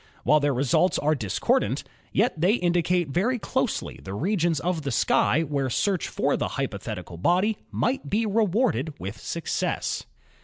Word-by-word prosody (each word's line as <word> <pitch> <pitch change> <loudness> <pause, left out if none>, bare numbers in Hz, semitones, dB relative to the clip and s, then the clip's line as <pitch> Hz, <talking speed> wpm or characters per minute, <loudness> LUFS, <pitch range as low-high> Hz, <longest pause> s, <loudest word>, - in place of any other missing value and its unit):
While 150 +5 +5
their 145 0 +1
results 135 +7 +2
are 150 +2 +2
discordant, 110 -10 0 0.3
yet - - +2
they 180 +6 +3
indi 175 -5 +2
cate 175 -1 +1
very 210 - +1
closely 260 +1 -2
the 95 +1 -6
regions 170 - +1
of 175 +1 -1
the 140 - -3
sky 140 +5 +3
where 140 -3 -1
search 190 - 0
for - - 0
the - - -1
hypothetical 85 - -4
body 185 - +2
might 265 +3 -1
be 220 +3 +1
rewarded 205 - +1
with 100 +3 -6
success. 170 - -2
170 Hz, 155 wpm, -25 LUFS, 140-205 Hz, 0.3 s, While